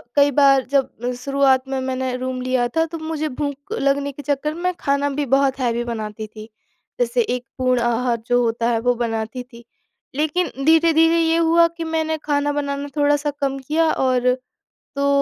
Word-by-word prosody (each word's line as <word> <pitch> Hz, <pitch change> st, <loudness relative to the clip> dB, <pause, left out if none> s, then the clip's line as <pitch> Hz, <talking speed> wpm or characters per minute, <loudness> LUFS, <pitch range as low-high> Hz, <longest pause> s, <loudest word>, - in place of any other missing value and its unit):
कई 285 Hz, 0 st, +5 dB
बार 275 Hz, -1 st, +5 dB
जब 250 Hz, -3 st, 0 dB
शुरुआत 275 Hz, -1 st, +2 dB
में 265 Hz, 0 st, -2 dB
मैंने 260 Hz, -1 st, -2 dB
रूम 255 Hz, 0 st, -4 dB
लिया 255 Hz, -1 st, +1 dB
था 325 Hz, 0 st, +3 dB
तो 335 Hz, -, -4 dB
मुझे 315 Hz, -1 st, -3 dB
भूख 285 Hz, +4 st, -5 dB
लगने 280 Hz, -6 st, 0 dB
के 280 Hz, -, -10 dB
चक्कर 290 Hz, +1 st, -1 dB
में 360 Hz, +2 st, -1 dB
खाना 280 Hz, 0 st, 0 dB
भी 285 Hz, +1 st, -2 dB
बहुत 270 Hz, 0 st, +2 dB
हेवी 240 Hz, -2 st, 0 dB
बनाती 220 Hz, -2 st, -5 dB
थी, 215 Hz, 0 st, -11 dB, 0.5 s
जैसे 245 Hz, 0 st, +1 dB
एक 245 Hz, +2 st, -2 dB
पूर्ण 255 Hz, -1 st, +2 dB
आहार 240 Hz, 0 st, +1 dB
जो 245 Hz, 0 st, +3 dB
होता 230 Hz, 0 st, 0 dB
है 230 Hz, -1 st, +1 dB
वो 245 Hz, +1 st, +2 dB
बनाती 230 Hz, +1 st, -3 dB
थी, 240 Hz, -1 st, -15 dB, 0.5 s
लेकिन 315 Hz, +5 st, 0 dB
धीरे-धीरे 325 Hz, +1 st, +4 dB
ये 325 Hz, 0 st, +2 dB
हुआ 335 Hz, 0 st, +4 dB
कि 335 Hz, 0 st, -7 dB
मैंने 320 Hz, -1 st, -1 dB
खाना 290 Hz, -1 st, 0 dB
बनाना 285 Hz, 0 st, -3 dB
थोड़ा-सा 290 Hz, 0 st, +2 dB
कम 275 Hz, -1 st, 0 dB
किया 315 Hz, +4 st, +1 dB
और 250 Hz, -1 st, +2 dB, 0.6 s
तो 280 Hz, 0 st, 0 dB
275 Hz, 175 wpm, -21 LUFS, 250-300 Hz, 0.6 s, कई